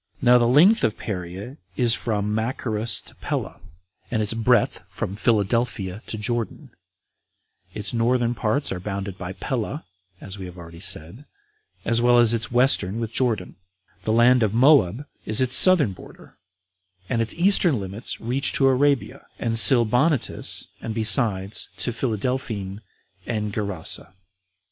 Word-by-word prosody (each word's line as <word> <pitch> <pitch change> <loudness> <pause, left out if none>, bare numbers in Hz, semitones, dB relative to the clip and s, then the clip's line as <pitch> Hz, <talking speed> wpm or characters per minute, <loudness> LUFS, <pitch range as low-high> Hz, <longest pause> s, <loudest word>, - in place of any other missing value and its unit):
Now 125 -1 +4
the 120 - +2
length 175 - +4
of 110 - 0
Perea 95 - -7 0.2
is 120 -3 +3
from 105 -3 -2
Machaerus 110 -2 -2
to - - -14
Pella, - - -5 0.5
and 115 - -2
its 105 0 -1
breadth 115 0 +1
from 95 - -5
Philadelphia 105 -2 -1
to 110 - -5
Jordan; 115 +2 -4 1.0
its 105 +2 -3
northern 120 +1 0
parts 125 +5 -2
are 95 - -4
bounded 100 0 -6
by 90 +1 -6
Pella, 130 - -5 0.3
as 95 0 -9
we 95 - -7
have 90 0 -12
already 85 -1 -12
said, 95 - +1 0.6
as 115 0 +1
well 120 0 +4
as 120 -1 +5
its 110 -2 -2
Western 120 -5 +2
with 115 -1 -5
Jordan; 115 -9 -1 0.4
the 110 - -2
land 120 +2 +4
of 110 -1 0
Moab 130 - +3 0.2
is 110 - +4
its 130 -1 +2
southern 165 - +7
border, - - -16 0.7
and 115 0 -1
its 115 - -2
eastern 175 - +3
limits 100 +4 -7
reach 125 +4 -1
to 135 - +2
Arabia, 135 0 0
and 115 -1 0
Silbonitis, 125 +4 +2 0.2
and 110 -1 -6
besides 105 -3 +2
to 120 - -1
Philadelphene 110 -4 -4 0.5
and 105 -3 -3
Gerasa. 95 -3 -4
115 Hz, 145 wpm, -22 LUFS, 100-125 Hz, 1.0 s, southern